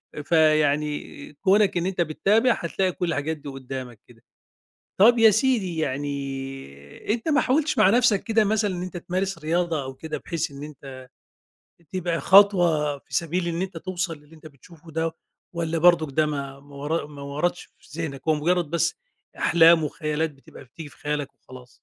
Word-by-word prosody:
آآ، 150 - -5
فيعني 150 -2 +1
كونك 195 +4 +2
إن 175 - -1
أنت 185 -2 -1
بتتابع، 210 +9 +2
هتلاقي 185 +2 -1
كُل 180 0 -3
الحاجات 160 0 -2
دي 145 -1 -9
قُدامك 130 -4 -7
كده. 115 -2 -20 0.8
طب 235 +4 +7
يا 225 -1 +8
سيدي 215 -6 +1
يعني 135 - -4
أنت 230 +5 -5
ما 295 0 +3
حاولتِش 300 +4 +1
مع 190 - +6
نفسك 235 -3 +3
كده 220 -1 +2
مثلًا 210 -2 0
إن 175 - -5
أنت 185 -1 -6
تمارس 185 +1 -3
رياضة 165 -1 -1
أو 130 0 -7
كده 155 +4 -6
بحيث 165 -4 -4
إن 140 +1 -9
أنت 135 -3 -10 0.9
تبقى 175 -2 -2
خطوة 175 -7 +4
في - - -14
سبيل 170 +1 -1
إن 170 +2 -2
أنت 190 -3 -5
توصل 175 -2 -4
للي 150 +2 -19
أنت 155 0 -15
بتشوفه 160 +3 -16
ده، 160 +1 -2 0.4
والّا 165 -1 -2
برضك 165 -4 +4
ده 155 -1 +3
ما 140 -2 -5
ما 140 0 -17
ور 145 +2 -2
ما 145 -1 -11
وردش 150 +6 -2
في 155 +3 -10
ذهنك، 140 -4 -5
هو 155 - +5
مجرد 170 +1 0
بس 170 0 +1 0.4
أحلام 165 -1 +5
وخيالات 150 +1 -2
بتبقى 135 -1 -15
بتيجي 145 +5 -11
في - - -19
خيالك 145 -1 -4
وخلاص؟ 125 -1 -14
160 Hz, 175 wpm, -24 LUFS, 145-180 Hz, 0.9 s, يا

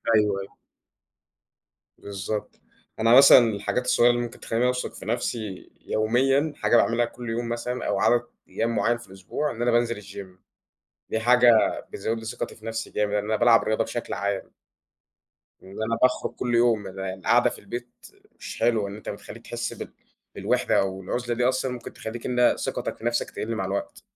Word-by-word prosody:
أيوه، 105 -2 +2
أيوه. 95 - -11 1.4
بالضبط، 100 +1 -5 0.4
أنا 115 +1 +4
مثلًا 140 0 +10
الحاجات 105 +4 -2
الصغيرة 120 -1 +4
اللي 120 0 -1
ممكن 120 -1 -6
تخلّيني 115 +2 -1
أوثق 125 0 -1
في - - -11
نفسي 110 -3 -3
يوميًا، 135 +7 +2
حاجة - - +2
باعملها 115 +1 +3
كل 120 0 -8
يوم 115 +1 -2
مثلًا 125 +1 -3
أو 100 -1 0
عدد 120 +3 +4 0.3
أيام 115 0 -1
معيّن 120 +1 +2
في 120 -4 -14
الأسبوع، 95 +10 -4
إن 115 - -7
أنا 120 0 +2
بانزل 115 -2 +1
الgym 95 -2 -10 0.7
دي 110 - 0
حاجة 120 +1 +6 0.4
بتزود 110 +3 -3
لي 110 - -10
ثقتي 110 - -5
في 110 - -16
نفسي 115 0 -4
جامد 105 -1 -1
أنا 105 +1 0
بالعب 115 +1 +5
رياضة 110 +1 +1
بشكل 120 +1 -5
عام. 100 -1 -3 1.1
إن 95 - -13
أنا 115 +1 -1
باخرج 130 0 +2
كل 120 -1 -1
يوم 115 -4 +3
القاعدة 95 0 +1
في - - -10
البيت 120 0 -7 0.5
مش - - -8
حلوة، 115 -3 +2
إن 100 - -7
أنت 105 - -8
بتخلّيك - - -9
تحس - - -4
بال - - -9 0.4
بالوحدة - - +1
أو 95 0 -3
العزلة 120 +5 -2
دي 125 - 0
أصلًا 130 0 +1
ممكن 125 -1 -7
تخلّيك 115 +1 -7
إن 125 -1 +3
ثقتك - - -3
في 115 - -11
نفسك 120 0 0
تقل 115 +1 -4
مع 110 - -2
الوقت. 295 0 -4
115 Hz, 175 wpm, -25 LUFS, 105-120 Hz, 1.4 s, مثلًا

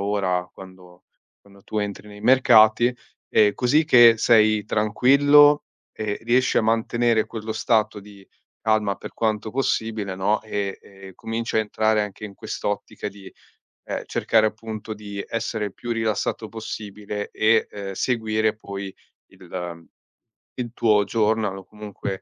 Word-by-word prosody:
ora 95 -3 -1
quando 90 -1 -15 0.4
quando 100 0 -19
tu - - -7
entri 105 0 -4
nei 105 0 -12
mercati, 120 -1 +5 0.3
ehm, 105 -1 +4
così 140 +7 +2
che 120 -6 +7
sei 110 -2 +3
tranquillo 140 +8 +4 0.4
e 105 -1 -2
riesci 125 +2 +2
a - - +4
mantenere 115 0 +1
quello 110 -1 -6
stato 110 -1 0
di 100 -1 -16 0.4
calma 110 -2 +1
per - - -10
quanto 110 -1 -2
possibile, 110 -5 -2
no, 100 +3 0
e, 100 -2 -4
ehm, 95 -1 -14
cominci 115 +2 -4
a - - +4
entrare 110 0 +1
anche 105 +1 -7
in 100 - -7
quest'ottica 105 +1 -5
di, 100 -1 -13 0.6
ehm, - - -4
cercare 110 -1 +2
appunto 110 0 -7
di 100 -1 -7
essere 115 -2 -3
il 100 - -6
più 120 - -6
rilassato 110 -1 -2
possibile 105 -2 -6
e, 110 +1 +2
ehm, 100 -1 -7
seguire 110 -2 0
poi 100 -2 -7 0.4
il, 90 - -18
ehm, 85 -2 -6 0.7
il 120 -2 -5
tuo 105 -4 +3
journal 105 -1 0
o 95 - -11
comunque 105 -2 -7
110 Hz, 145 wpm, -23 LUFS, 100-115 Hz, 0.7 s, che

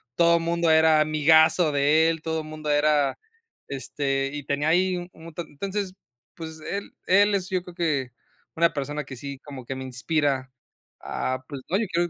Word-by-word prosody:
todo 170 +1 +5
el 165 - -3
mundo 170 0 +1
era 160 -1 +5
amigazo 155 +2 +4
de 150 +3 +4
él, 165 -1 -2
todo 160 0 -2
el 155 - -10
mundo 155 -1 -6
era, 145 -1 +2 0.5
este, 135 0 -2
y 145 -1 -5
tenía 145 +2 -1
ahí, 180 +2 +2
u 175 0 -7
un 165 0 -12
ta 170 +2 -4
entonces, 195 +5 -4 0.4
pues, 160 -1 -8
él 200 +5 -5 0.2
él 205 +2 +5
es 185 -2 -1
yo 185 -2 -1
creo 180 -1 -12
que, 145 -8 -1 0.5
una 170 0 +3
persona 145 +1 -3
que 135 - -8
sí 140 +1 -7
como 140 -3 -9
que 135 - -4
me 130 - -6
inspira 135 0 -1 0.5
a 130 0 -3
pues, 140 -3 -7
no, 185 - +2
yo 225 - 0
quiero 175 0 +1
155 Hz, 195 wpm, -25 LUFS, 140-170 Hz, 0.5 s, todo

